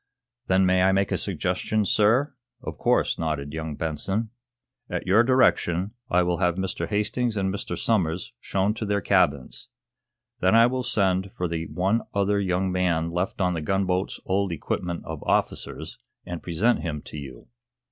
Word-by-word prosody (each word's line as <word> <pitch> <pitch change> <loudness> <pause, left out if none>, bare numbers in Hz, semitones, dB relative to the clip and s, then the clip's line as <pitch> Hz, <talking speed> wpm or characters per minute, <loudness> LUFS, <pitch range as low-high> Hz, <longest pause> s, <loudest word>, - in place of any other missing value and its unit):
"Then 95 0 +4
may 90 0 +3
I 95 +1 +4
make 100 0 +1
a - - +2
suggestion, 110 -1 -1
sir?" 115 +10 +3 0.3
"Of - - -6
course," - - +2
nodded 75 -3 -2
young 80 -1 -4
Benson. 95 +9 -2 0.6
"At - - -3
your 100 +5 +5
direction 105 -7 +2 0.2
I 90 -4 +3
will 90 0 0
have 90 -2 +2
Mr. 95 0 -2
Hastings 110 +2 0
and 95 -1 0
Mr. 100 - -4
Somers 90 -3 0
shown 100 -2 0
to 110 - -4
their 100 0 +1
cabins. 70 -6 +1 0.7
Then 95 +4 +3
I 115 0 +7
will 130 +1 0
send 95 -5 +1
for 90 - 0
the 80 -1 -3
one 95 +6 +1
other 100 0 +2
young 95 -1 0
man 85 -3 0
left 90 +2 -2
of 90 -2 +2
the 80 - -3
gunboat's 95 +2 0
old 95 0 0
equipment 85 +2 -3
of 80 -2 -6
officers, - - -2 0.3
and 85 -2 -5
present 95 +8 +1
him 75 -4 -4
to - - -9
you. 65 -4 -10
95 Hz, 165 wpm, -25 LUFS, 85-105 Hz, 0.7 s, I